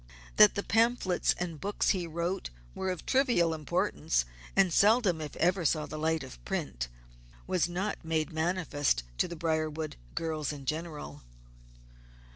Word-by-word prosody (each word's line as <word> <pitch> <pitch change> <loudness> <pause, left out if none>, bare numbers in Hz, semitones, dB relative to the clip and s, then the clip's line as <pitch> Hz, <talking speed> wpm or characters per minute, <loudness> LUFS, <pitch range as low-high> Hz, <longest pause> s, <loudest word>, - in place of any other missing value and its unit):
That 210 -1 +8
the 200 - -1
pamphlets 225 -5 +2
and 170 -4 -4
books 205 +1 0
he 180 -3 +1
wrote 170 +3 -2 0.2
were 190 - -2
of 180 -2 -4
trivial 240 -12 +3
importance, 95 - 0 0.3
and 190 -3 +4
seldom 205 -5 +4
if 150 -2 -6
ever 180 +1 +2
saw 155 -1 +1
the 155 - -6
light 160 -1 0
of 125 - -11
print, - - -3 0.6
was 180 -2 +1
not 190 +4 -3
made 160 0 -1
manifest 160 - 0 0.2
to - - +3
the 170 - -6
Briarwood 155 -1 -2 0.2
girls 155 -3 -2
in 140 -2 -8
general. 155 - -4
165 Hz, 145 wpm, -30 LUFS, 155-185 Hz, 0.6 s, That